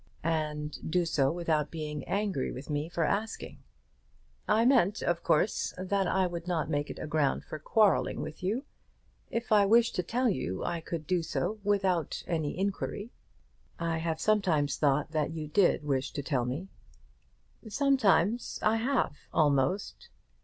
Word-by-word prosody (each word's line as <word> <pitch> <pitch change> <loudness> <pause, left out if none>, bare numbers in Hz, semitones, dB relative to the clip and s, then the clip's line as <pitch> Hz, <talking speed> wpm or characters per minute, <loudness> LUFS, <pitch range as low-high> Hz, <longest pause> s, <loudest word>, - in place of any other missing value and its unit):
"And 155 -2 -2
do 175 +1 +2
so 140 -4 +2
without 160 -4 0
being 150 -3 -5
angry 200 -9 -1
with 140 +4 -7
me 145 +2 -1
for 170 -1 -1
asking." 210 +7 -2 0.9
"I 220 +2 +3
meant, 225 -6 +3
of 175 -1 0
course, 185 +7 +1
that 190 +1 0
I 190 +1 +2
would 175 -1 -5
not 160 -4 -1
make 145 -1 -1
it - - -6
a - - -5
ground 155 -3 +1
for 155 - -7
quarrelling 210 +6 +2
with 155 +2 -6
you. 220 +10 -1 0.6
If 230 0 -3
I 205 -2 +6
wished 230 +2 +4
to - - +3
tell 245 +8 0
you 95 - -1
I 170 -1 -2
could 160 -1 -5
do 180 +2 +1
so 210 +6 -2
without 190 -6 0
any 160 -3 -2
inquiry." 200 +3 -3 0.7
"I 165 -1 -1
have 160 -1 -2
sometimes 175 -10 +2
thought 145 0 +1
that 155 0 -1
you 155 -2 -5
did 175 -1 +3
wish 135 -2 -1
to 145 - -4
tell 135 -4 0
me." 145 +10 -4 1.0
"Sometimes 235 - +2
I 215 +1 +3
have, 250 - 0 0.2
almost." 145 +5 +1
170 Hz, 160 wpm, -30 LUFS, 150-205 Hz, 1.0 s, I